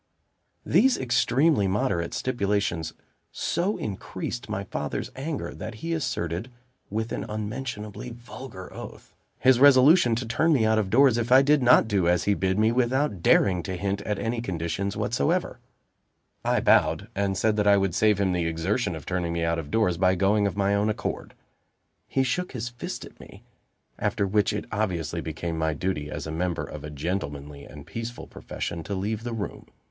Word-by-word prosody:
These 265 -1 +4
extremely 130 -1 +2
moderate 95 -4 -1
stipulations 100 -9 -1 0.4
so 185 +5 -1
increased 95 - -5
my - - -2
father's - - -4
anger, 145 +3 -4
that 110 - -7
he 165 +9 -4
asserted, 115 - -2 0.4
with 110 +2 -3
an - - -3
unmentionably 105 +1 -5
vulgar 120 -4 -10
oath, - - -10 0.2
his 130 -1 +4
resolution 140 -1 +6
to 120 +2 -3
turn 155 +8 +2
me 120 -6 +3
out 110 0 +3
of 100 -3 -1
doors 125 +1 +5
if 120 +1 -2
I 130 +1 +8
did 145 +1 +4
not 125 -2 +6
do 100 -5 +1
as 90 0 +3
he 100 - +2
bid 95 -1 0
me, 110 +1 +3
without 125 - +1
daring 90 0 +4
to 95 +2 -4
hint 100 +2 -2
at 105 0 -2
any 115 +3 -2
conditions 95 0 -3
whatsoever. 70 - 0 0.8
I - - +1
bowed, - - +3
and 95 -1 -1
said 110 +3 +2
that 105 -1 +2
I 100 0 +6
would 95 -3 0
save 105 0 +3
him 95 -2 +2
the 85 -2 0
exertion 85 +5 -1
of 80 - -9
turning 90 -2 -2
me 85 0 -1
out 85 0 0
of 75 -3 -7
doors, 105 -5 +1
by 95 0 +4
going 100 +2 +2
of 100 - -5
my 100 0 +2
own 100 +1 +2
accord. 105 - -4 0.7
He 135 - +1
shook 180 +8 -2
his 120 -1 -4
fist 120 -1 -6
at - - -16
me; - - -14 0.6
after 100 - 0
which 105 +1 +2
it 105 - -3
obviously 85 -6 -2
became 80 +1 -4
my 80 -1 0
duty, 75 -3 -2
as - - -5
a 80 - -5
member 85 +1 -1
of 75 - -8
a 75 - -6
gentlemanly 75 -2 -4
and 70 -1 -11
peaceful 115 +1 -6
profession, 85 - -6
to 100 - -3
leave 105 +3 -2
the 120 - -4
room. 105 -3 -5
100 Hz, 185 wpm, -26 LUFS, 90-120 Hz, 0.8 s, I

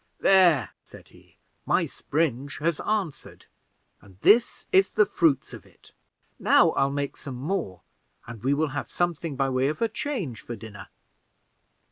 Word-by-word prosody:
"There," 170 - +4
said - - -16
he, - - -22 0.3
"my - - +1
spring 145 -3 -2
has 165 0 -1
answered, 205 -8 -4 0.6
and 95 -2 -19
this 235 +2 +3
is 190 0 +3
the 210 - +4
first - - -26
fruits 150 -6 +2
of - - -10
it. - - -22 0.5
Now - - +4
I'll 135 - +1
make 140 0 -3
some 140 -4 -8
more, 125 - -3 0.4
and 115 -3 -10
we 135 +4 +1
will 155 +1 0
have 145 - -5
something 170 -3 -2
by 135 0 0
way 130 +1 +1
of 150 +2 -3
a 230 - +2
change 215 - -4
for 120 - -7
dinner." 105 -3 -11
145 Hz, 160 wpm, -25 LUFS, 130-175 Hz, 0.6 s, There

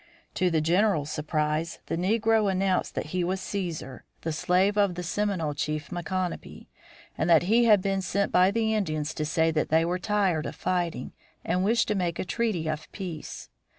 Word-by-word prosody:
To 185 -1 +1
the 160 -2 +1
general's 165 -2 +2
surprise 155 +2 -1
the - - -2
negro 215 +3 +2
announced 190 0 0
that - - -2
he 180 -1 +1
was 185 +2 -1
Cæsar, 170 -10 -4 0.2
the 160 - -2
slave 180 +5 +2
of 200 -4 +2
the 180 - -4
Seminole 180 -4 -1
chief 150 +3 -3
Micanopy, 180 0 -4 0.5
and - - -1
that 165 -1 +6
he 230 +6 +4
had 210 -4 +5
been 195 -1 0
sent 200 +1 -1
by 180 +1 +5
the 220 +1 0
Indians 155 -7 -1
to 155 - -2
say 160 +1 +2
that 155 -1 -1
they 160 +1 +3
were 180 +2 -1
tired 190 -5 0
of - - -7
fighting 175 -8 -2 0.3
and 180 +2 +1
wished 230 +3 +2
to - - +2
make 175 -4 -1
a - - -3
treaty 205 -6 -1
of 155 0 -4
peace. 180 -6 -7
180 Hz, 185 wpm, -27 LUFS, 160-200 Hz, 0.5 s, that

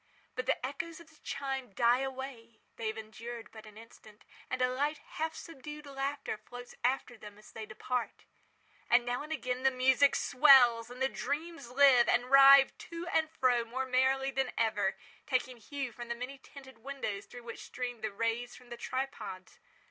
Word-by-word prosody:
But 255 - -4
the - - 0
echoes 325 +5 -5
of 330 -1 -15
the 310 - -22
chime 270 -5 -4
die 240 +3 +4
away—they 260 -4 -7
have 220 0 -3
endured 230 +2 -8
but 220 -1 -12
an 215 0 -14
instant—and 220 +2 -10
a 250 - +3
light, 290 +4 0
half 315 +2 -5
subdued 300 -1 -9
laughter 275 -3 -3
floats 245 +3 -11
after 250 -2 0
them 210 -1 -11
as 210 - -16
they 220 -1 -7
depart. 245 +2 -4 0.6
And 240 0 +5
now 245 0 -1
again 265 -5 -3
the 265 - +5
music 265 +2 +4
swells, 250 -4 +6
and 250 +2 -4
the - - +4
dreams 295 +1 -4
live, 255 -2 +6
and 245 +1 +1
writhe 275 0 +8
to 335 +1 -6
and 320 -1 +1
fro 255 -6 +2
more 255 +3 -3
merrily 265 +1 +2
than 270 0 -1
ever, 215 -4 +1 0.3
taking 255 -2 -1
hue 270 +3 -5
from 240 +1 -8
the 235 - -3
many 255 +3 -7
tinted 265 -3 -14
windows 225 -6 -5
through 245 -1 -11
which 230 -1 -8
stream 245 -2 -5
the 220 - -2
rays 230 +3 -2
from 250 -1 -16
the 240 - -6
tripods. 235 -9 -5
255 Hz, 175 wpm, -32 LUFS, 235-275 Hz, 0.6 s, writhe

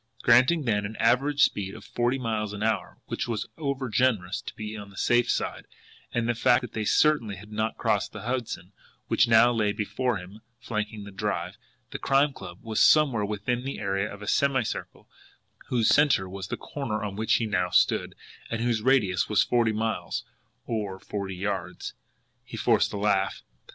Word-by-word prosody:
Granting, 130 +7 +5
then, 105 -5 +1
an 105 +2 -5
average 135 +6 +3
speed 95 0 0
of 110 - -11
forty 120 +2 0
miles 110 -4 -2
an 105 0 -4
hour, 110 0 -1
which - - -3
was 115 -3 -2
overgenerous 130 - 0
to - - -6
be 110 0 -6
on 100 -2 -8
the 95 - -16
safe 120 0 +2
side, - - -2 0.4
and 120 -1 -1
the 120 - +2
fact 120 +2 +3
that 125 - -7
they 110 -1 -2
certainly 130 -6 +3
had 105 +3 -13
not 110 +1 -2
crossed 110 -4 0
the - - -8
Hudson, 115 -7 -3 0.4
which 120 - +4
now 115 +1 +6
lay 105 -3 +1
before 105 +3 -1
him, 95 +4 -11 0.2
flanking 105 -2 -4
the 100 - -9
Drive, 95 -3 -3 0.4
the - - -5
Crime 140 +1 +3
Club 85 -8 -9
was 110 -2 -1
somewhere 140 -9 +5
within 105 +4 -2
the 135 +1 -4
area 100 0 -1
of 100 +1 -9
a - - -8
semicircle, 135 -5 0 0.6
whose 120 -3 +1
centre 140 -11 +4
was 95 0 -6
the - - -4
corner 110 -7 -4
on 100 -2 -4
which 110 +1 +2
he 115 - +1
now 90 -4 0
stood, - - +2 0.3
and 115 - -2
whose 115 -2 0
radius 110 -7 +2
was 105 -3 +4
forty 120 -2 +2
miles 110 +1 -2 0.4
OR 105 -5 -3
FORTY 100 -1 -5
YARDS! 100 +1 -4 0.5
He - - -9
forced - - +2
a - - -4
laugh. 100 -1 0
110 Hz, 180 wpm, -27 LUFS, 100-120 Hz, 0.6 s, now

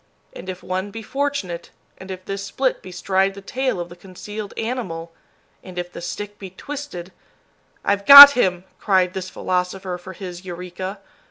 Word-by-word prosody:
And 185 - -10
if 185 -1 -7
one 185 +2 -3
be 225 +2 -9
fortunate, 270 -10 -3 0.3
and 190 - -11
if 185 -1 -8
this 195 0 -5
split 260 +6 -2
bestride 190 +1 -1
the - - -9
tail 255 0 -2
of 175 0 -5
the 175 - -12
concealed 200 +3 -9
animal, 185 -9 -4 0.5
and 185 -1 -12
if 175 0 -5
the - - -9
stick 205 +4 -7
be 195 - -8
twisted 190 -5 -8 0.7
"I've 200 0 0
got 280 0 +14
him!" 185 -9 0 0.2
cried 185 -3 +1
this 185 -1 -5
philosopher 180 0 -3
for 185 +1 -10
his 180 -1 -9
"Eureka." 180 +2 -7
190 Hz, 165 wpm, -21 LUFS, 180-205 Hz, 0.7 s, got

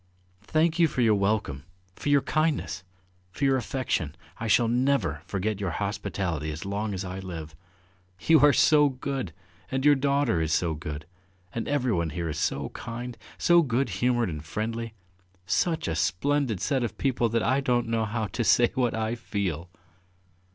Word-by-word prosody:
"Thank 160 +1 +2
you 165 - +6
for 130 - -2
your 115 -2 +5
welcome, 100 -9 0 0.3
for - - -3
your 145 -1 +4
kindness, 155 - 0 0.5
for 140 +10 -2
your 135 -1 +4
affection.... 125 - -2 0.2
I 115 - -3
shall 115 +2 +4
never 120 - +1
forget 100 +1 -2
your 100 -3 -1
hospitality 95 -6 -2
as 75 +4 -6
long 100 +1 -2
as 95 +1 -4
I 95 +1 -5
live. 80 -5 -7 0.7
You 160 - +5
are 145 +1 +7
so 150 +2 +5
good, 130 -6 -4 0.4
and 135 +1 -1
your 145 - +8
daughter 140 - +1
is 80 -1 0
so 85 -1 +1
good, 75 -1 -6 0.5
and 115 - -3
everyone 125 - +1
here 85 +2 -3
is 75 - -4
so - - -1
kind, 120 +1 -6 0.2
so 175 -1 +5
good 130 -3 0
humoured 120 +2 +1
and 75 -3 -5
friendly... 115 +5 -4 0.5
Such 165 - 0
a 80 - 0
splendid 110 - 0
set 135 -4 +1
of 115 - -4
people 120 -4 +1
that 115 0 0
I 130 +3 +2
don't 120 -3 +1
know 115 -1 0
how 110 +1 -2
to 105 +5 -2
say 120 +2 +4
what 125 -3 +1
I 110 0 -1
feel!" 95 -8 -3
115 Hz, 170 wpm, -27 LUFS, 90-135 Hz, 0.7 s, your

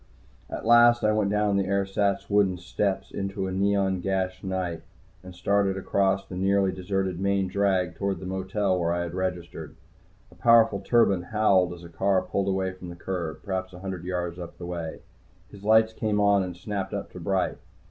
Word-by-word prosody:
At - - -6
last 120 +1 +6
I 105 - +4
went 105 -2 +1
down 105 -1 +1
the 95 -1 0
ersatz 100 0 0
wooden 100 -3 +2
steps 95 +2 -2
into 95 0 -3
the 95 - -3
neon 95 0 +1
gashed 95 0 -2
night 90 -4 -3 0.4
and 95 -1 -11
started 100 +1 +1
across 95 0 +1
the 90 - -8
nearly 95 +1 +2
deserted 95 -1 -2
main 100 0 +1
drag 95 -2 +1
toward 100 0 -2
the 95 - -8
motel 95 0 -1
where 85 -1 0
I 85 0 -1
had 85 -1 -6
registered. 90 -4 -4 0.6
A - - -17
powerful 115 -3 +5
turbine 100 -3 +3
howled 95 -2 +2
as 85 0 -12
a - - -9
car 95 +3 +1
pulled 100 0 -2
away 95 -1 0
from 90 -1 -10
the 85 - -8
curb, 85 -4 -5
perhaps 95 -1 -3
a 90 - -10
hundred 95 -3 -5
yards 90 -1 -3
up 85 - -8
the 85 - -7
way. 85 -2 -5 0.5
His 100 -1 -13
lights 110 +1 +4
came 105 -2 -1
on 100 -1 +4
and 90 -2 -5
snapped 100 +1 -4
up - - -5
to - - -9
bright. - - -1
95 Hz, 190 wpm, -26 LUFS, 90-100 Hz, 0.6 s, last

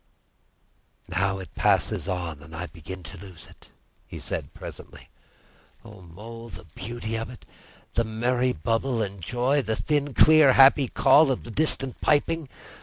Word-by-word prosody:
"Now 95 0 0
it 95 -1 -10
passes - - +1
on 85 -5 -4
and 80 +2 -12
I 90 +2 -4
begin 90 +2 -10
to 85 +2 -9
lose 95 -3 -11
it," - - -19 0.4
he - - -9
said - - -5
presently. - - -11 0.8
"O 105 -4 -13
Mole! 115 +7 -11
the 95 -4 -11
beauty 110 +7 -6
of 115 - -5
it! 125 - -13 0.5
The 115 - +2
merry 120 +3 0
bubble 115 - -1
and 100 -2 -6
joy, 125 - +1
the 110 -3 -2
thin, 145 -1 -1
clear, 155 -4 +7
happy 135 0 +6
call 140 +5 +5
of 130 - -1
the 120 - -9
distant 135 -1 -1
piping! 150 0 +1
115 Hz, 155 wpm, -25 LUFS, 95-130 Hz, 0.8 s, clear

